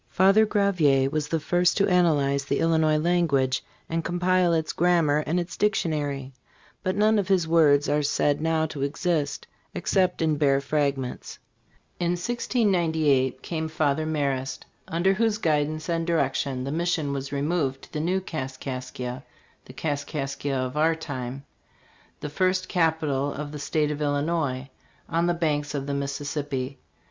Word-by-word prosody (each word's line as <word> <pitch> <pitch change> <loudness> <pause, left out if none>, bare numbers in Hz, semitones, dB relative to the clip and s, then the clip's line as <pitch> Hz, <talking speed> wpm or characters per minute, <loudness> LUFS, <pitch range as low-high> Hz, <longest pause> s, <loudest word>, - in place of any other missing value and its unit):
Father 195 +4 +4
Gravier 155 -11 +2
was 150 -1 -1
the 165 +1 0
first 175 +3 +2
to 200 - +3
analyze 145 -7 +2
the - - 0
Illinois 160 -2 +3
language 150 -6 +1 0.2
and 165 0 -2
compile 180 +1 +2
its 160 -1 0
grammar 165 -4 +3
and 175 +3 +1
its 175 -1 -5
dictionary, 145 -9 -1 0.5
but 185 0 -1
none 215 +1 +3
of 195 - -1
his 185 -4 +2
works 150 -3 +4
are 150 +1 +2
said 145 0 +1
now 160 0 +1
to 150 -3 -6
exist 145 0 -1 0.3
except 185 -3 +1
in 155 -2 +1
bare 140 -2 +3
fragments. 140 -2 -2 0.6
In 175 0 +1
1698 170 - +1
came 160 -2 -3
Father 155 -1 0
Marest, 135 -4 -2 0.2
under 175 +4 +2
whose 220 +1 +1
guidance 155 -3 0
and 165 -1 -1
direction 140 -5 0
the 135 - -3
mission 160 -3 0
was 135 0 -4
removed 140 -2 -1
to - - -15
the 150 - -2
new 180 +5 +1
Kaskaskia 130 -4 -5 0.4
(the - - -12
Kaskaskia 145 -2 -3
of 130 +1 -3
our 160 +2 +3
time 135 -4 -6 0.8
the - - -3
first 185 +3 0
capital 155 -5 +1
of 145 +1 -6
the 150 - -7
state 150 +1 0
of 150 0 -4
Illinois), 145 -2 -1 0.4
on 170 +1 +1
the 175 - +1
banks 150 -3 -1
of 140 -1 -2
the 140 - -3
Mississippi. 140 -1 -3
155 Hz, 150 wpm, -25 LUFS, 140-170 Hz, 0.8 s, Father